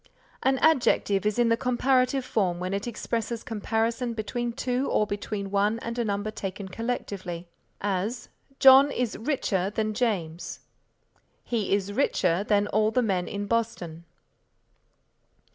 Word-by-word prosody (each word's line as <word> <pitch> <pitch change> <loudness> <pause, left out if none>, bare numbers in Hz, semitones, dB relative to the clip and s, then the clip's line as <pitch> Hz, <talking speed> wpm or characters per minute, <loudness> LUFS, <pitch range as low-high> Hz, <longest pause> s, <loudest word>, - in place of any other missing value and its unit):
An 265 0 +2
adjective 210 -9 +3
is 210 - 0
in 240 -1 +3
the 230 - +4
comparative 255 +2 +1
form 185 -8 0
when 185 +1 -3
it 200 +3 -2
expresses 230 0 -3
comparison 230 +2 -1
between 240 +2 -2
two 250 +3 -1
or 210 - +2
between 205 -1 -4
one 205 +2 +2
and 235 +1 -4
a - - +2
number 205 0 -2
taken 195 -1 -6
collectively, 185 -6 -4 0.3
as, 205 +4 -2 0.3
"John 270 +1 +8
is 250 -5 -2
richer 220 -8 -1
than 215 +1 -1
James"; 190 -8 -2 0.8
"he 225 -5 -2
is 200 0 -3
richer 190 -7 +1
than 205 -1 +2
all 215 0 +2
the 250 +3 +1
men 185 -5 0
in 205 0 -4
Boston." 200 -7 -2
215 Hz, 140 wpm, -27 LUFS, 200-240 Hz, 0.8 s, John